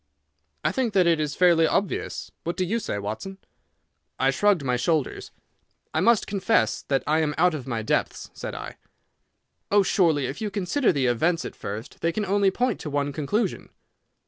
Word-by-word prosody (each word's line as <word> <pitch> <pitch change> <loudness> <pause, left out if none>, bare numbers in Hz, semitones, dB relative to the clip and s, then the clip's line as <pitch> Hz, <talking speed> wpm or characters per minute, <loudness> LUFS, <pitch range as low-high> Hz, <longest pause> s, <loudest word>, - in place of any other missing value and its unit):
"I - - +2
think 245 -5 -1
that 185 -2 +4
it 165 -2 +3
is 150 -2 -2
fairly 170 -3 +5
obvious. 195 +2 -2
What 170 - -3
do 185 - +1
you 225 +6 0
say, 105 - -3
Watson?" 110 - -5 0.8
I 135 +1 +3
shrugged 200 +1 +2
my 125 -2 +1
shoulders. 150 +3 -1 0.6
"I - - +1
must 235 -2 +4
confess 205 +3 +1
that 135 -1 -1
I 155 +2 +2
am 150 -2 0
out 180 +1 +4
of 140 -5 -6
my 115 -3 -2
depths," - - -1
said - - -6
I. - - -7 0.9
"Oh 205 0 +5
surely 165 -8 +2
if 135 +8 -5
you 215 - -1
consider 205 +7 +1
the 140 -6 0
events 160 +8 +1
at - - -7
first 105 +3 -7
they 165 - +1
can 210 +4 -2
only 200 0 +3
point 245 +4 -1
to 150 - -5
one 145 0 -1
conclusion." 165 +11 -2
165 Hz, 185 wpm, -25 LUFS, 140-200 Hz, 0.9 s, fairly